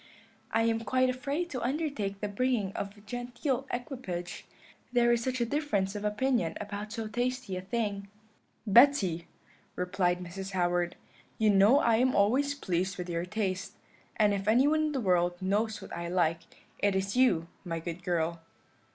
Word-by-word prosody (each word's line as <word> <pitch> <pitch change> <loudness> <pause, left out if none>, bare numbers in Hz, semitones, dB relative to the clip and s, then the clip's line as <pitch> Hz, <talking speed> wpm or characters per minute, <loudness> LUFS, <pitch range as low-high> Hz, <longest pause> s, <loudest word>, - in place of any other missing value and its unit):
I 225 - +2
am 225 0 +2
quite 255 +2 +2
afraid 285 +7 -3
to 255 - -3
undertake 260 -9 -2
the 210 - -1
bringing 210 -2 0
of 200 +1 -5
a - - -15
genteel 245 +4 -3
equipage, 240 -9 -5 0.4
there 240 -1 +4
is 235 -1 0
such 255 0 -1
a 235 - +2
difference 225 -9 0
of 205 - -4
opinion 210 -4 0
about 210 0 -5
so 225 -1 -4
tasty 245 -3 -2
a 185 - -3
thing.' 200 0 -2 0.6
"'Betty,' 200 - +5 0.5
replied 180 0 0
Mrs. 190 +2 -7
Howard, 175 -1 +1 0.4
'you 215 -1 +4
know 205 +7 +6
I 230 -1 +3
am 255 +2 +2
always 265 +8 +3
pleased 185 -5 -1
with 180 -1 -5
your 170 +1 -1
taste; 190 -1 -2 0.4
and 210 -2 +3
if 195 0 -3
anyone 290 +8 +4
in 305 - -1
the 270 - 0
world 175 -3 +2
knows 210 +4 -1
what - - -8
I 170 0 -4
like, 170 -2 +1 0.4
it 200 -1 +2
is 195 +2 -1
you, 190 -11 +3 0.2
my 165 -3 -3
good 170 +1 -6
girl.' 170 -1 -1
205 Hz, 170 wpm, -30 LUFS, 185-245 Hz, 0.6 s, know